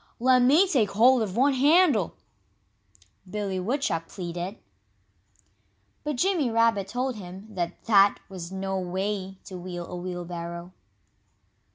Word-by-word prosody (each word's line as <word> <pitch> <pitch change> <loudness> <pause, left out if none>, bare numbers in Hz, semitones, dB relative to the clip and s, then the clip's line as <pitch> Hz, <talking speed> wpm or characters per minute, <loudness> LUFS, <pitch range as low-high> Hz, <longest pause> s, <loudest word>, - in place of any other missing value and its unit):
"Let 255 +1 +4
me 295 +10 +5
take 250 - +2
hold 240 +5 +5
of 200 -2 -3
one 275 +3 +4
handle!" 285 - +4 1.1
Billy 200 -2 -3
Woodchuck 185 - -1
pleaded. 175 +2 -5 1.5
But 300 -1 -2
Jimmy 330 -2 +1
Rabbit 230 -4 +2
told 250 +3 -2
him 190 0 -9
that 175 -2 -4
that 200 -3 +5
was 185 -3 -8
no 190 0 -3
way 190 +1 -3
to 185 -2 -8
wheel 175 -1 -6
a 180 - -8
wheelbarrow. 175 -1 -6
195 Hz, 125 wpm, -26 LUFS, 180-250 Hz, 1.5 s, me